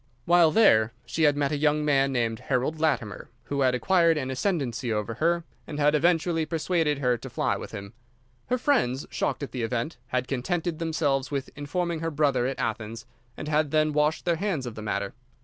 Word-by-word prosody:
While 170 -1 +6
there 120 - +4
she 155 +7 +1
had 145 -1 +3
met 140 -1 +1
a 150 - 0
young 150 0 +2
man 135 -2 +3
named 115 -3 -1
Harold 135 +4 -1
Latimer, 130 - -1
who 140 -1 -2
had 130 -1 +3
acquired 170 +3 +3
an 130 -3 -2
ascendancy 130 - -1
over 105 +1 -2
her 170 +7 +1 0.2
and 150 - -5
had 150 0 +4
eventually 165 +1 +2
persuaded 160 -1 0
her 125 -3 +1
to - - -8
fly - - 0
with - - -7
him. 100 +1 -8 0.5
Her 250 - +1
friends, 150 - +1
shocked - - -2
at 140 - -5
the 125 - -4
event, 115 +6 -2
had 125 0 -1
contented 165 +5 -2
themselves 150 -5 0
with 140 -2 -3
informing 165 +4 -2
her 165 +1 -2
brother 140 -5 +1
at 135 - -3
Athens, 115 +1 -4 0.3
and 150 - -6
had 155 0 +1
then 155 0 +2
washed 150 +1 +1
their 170 -2 +1
hands 175 -8 -2
of 120 - -5
the 110 - -8
matter. 100 -2 -2
145 Hz, 200 wpm, -26 LUFS, 125-160 Hz, 0.5 s, While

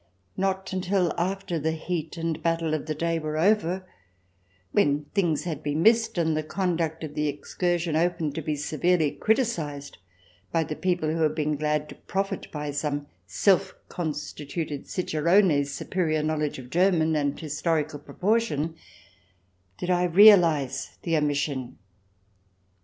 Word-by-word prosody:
Not 190 0 -1
until 185 -1 +1
after 180 -1 -2
the 160 +2 0
heat 165 0 -4
and 165 0 -1
the - - -11
battle 165 -1 0
of 155 -1 -2
the 155 - -2
day 165 +1 0
were 155 0 -3
over, 185 0 +2 0.9
when 145 +1 +2
things 175 -7 +1
had 160 -4 -4
been 150 +2 -1
missed, 225 -1 +4
and 160 -2 +1
the 155 - 0
conduct 165 -1 -2
of 150 -2 -5
the 150 0 0
excursion 170 +3 -1
open 165 -2 +1
to 160 - -3
be 155 0 -2
severely 155 +2 +1
criticized 165 - -1 0.5
by 165 -1 +2
the 155 0 -5
people 175 -4 0
who 165 +1 -1
had 155 -1 +2
been 150 -1 0
glad 150 0 -1
to - - -8
profit 195 +1 -4
by 150 -1 -4
some 145 0 -2 0.2
self 190 - +2
constituted 150 -2 -4
cicerone's 170 -3 +2
superior 155 -1 -1
knowledge 155 -1 -1
of 125 -1 -10
German 170 -3 +3
and 145 -1 0
historical 155 -1 -1
proportion, 165 +1 0 1.0
did 180 - -2
I 180 0 +3
realize 165 -8 +5
the 165 -2 0
omission. 145 -4 -1
160 Hz, 145 wpm, -26 LUFS, 150-180 Hz, 1.0 s, realize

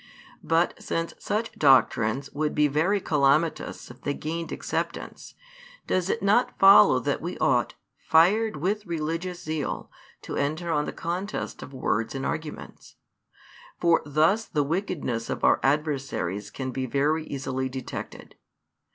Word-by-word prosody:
But 165 +2 +1
since 165 0 -2
such 220 +2 -2
doctrines 130 -2 +3
would 150 +1 -2
be 150 0 +4
very 160 +8 +1
calamitous 150 -3 +1
if 125 - -16
they 145 - -2
gained 165 +2 -4
acceptance, - - -4 0.5
does 185 0 0
it 230 - -1
not 210 +5 +2
follow 195 +1 +8
that - - -2
we - - -5
ought, - - +1 0.3
fired 205 +8 +4
with 200 +6 -2
religious 170 +2 -3
zeal, 155 -2 -4 0.3
to - - -5
enter 155 +4 -1
on 150 -2 +1
the - - -4
contest 180 +5 -4
of - - -9
words 120 -3 -1
and 135 - -3
arguments? 155 -1 -6 0.8
For 170 -1 +4
thus 160 +10 +2
the 150 -2 0
wickedness 145 - -2
of - - -4
our - - +5
adversaries 135 - -1
can 130 +4 -5
be 130 0 -3
very 150 +5 +1
easily 130 -1 -3
detected. 130 -1 -7
155 Hz, 140 wpm, -26 LUFS, 135-175 Hz, 0.8 s, follow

